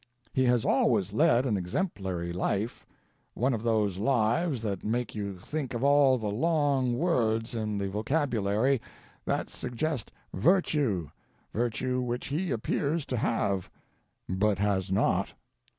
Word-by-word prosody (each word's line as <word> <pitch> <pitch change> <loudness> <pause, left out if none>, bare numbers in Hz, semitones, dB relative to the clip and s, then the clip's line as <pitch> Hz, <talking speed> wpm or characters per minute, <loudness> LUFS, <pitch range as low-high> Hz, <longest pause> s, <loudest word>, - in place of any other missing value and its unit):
He 130 - +2
has 120 -2 +3
always 225 -7 +2
led 145 -5 +4
an 110 -6 +1
exemplary 90 - -2
life 100 +5 -2 0.5
one 130 +3 +1
of 110 - -2
those 105 -5 +1
lives 125 - +1
that 100 -4 -3
make 120 +1 -1
you 100 -3 -4
think 135 +7 -4
of 120 - -2
all 140 -2 +5
the 110 -3 -3
long 135 -1 +1
words 115 -8 +1
in 110 -2 -2
the 100 0 -1
vocabulary 115 +1 +1 0.4
that - - -1
suggest 130 +1 -3 0.2
virtue, 135 - +2 0.4
virtue 120 +2 -1
which 125 +1 -3
he 170 +6 -1
appears 140 +5 -1
to 125 - -2
have, 100 -4 0 0.6
but 100 +2 +1
has 100 -1 0
not. 95 - +1
120 Hz, 135 wpm, -29 LUFS, 105-140 Hz, 0.6 s, all